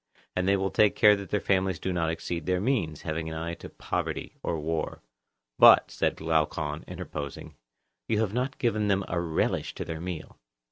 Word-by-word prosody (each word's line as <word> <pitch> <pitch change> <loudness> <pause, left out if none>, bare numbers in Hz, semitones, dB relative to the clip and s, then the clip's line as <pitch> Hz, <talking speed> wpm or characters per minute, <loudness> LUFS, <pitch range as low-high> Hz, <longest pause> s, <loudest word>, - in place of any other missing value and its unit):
And 90 0 0
they 100 0 +4
will 95 0 -1
take 105 +6 +4
care 105 0 +7
that 100 -1 -7
their 105 - +1
families 95 -2 +1
do 95 +3 -3
not 85 -2 0
exceed 85 0 -4
their 90 -1 +2
means; 100 - -1
having 80 0 -3
an 80 - -5
eye 85 +1 -3
to - - -9
poverty - - -4
or 80 - -2
war. 80 -2 -3 0.6
But, - - +8
said - - 0
Glaucon, 80 -1 -1
interposing, 75 -6 -6 0.5
you 110 - +1
have 105 -3 -1
not 130 +3 -1
given 110 -3 +1
them 100 -1 +1
a 85 - -1
relish 80 -2 -1
to - - -4
their 80 0 -5
meal. 90 -3 -6
90 Hz, 190 wpm, -28 LUFS, 80-100 Hz, 0.6 s, But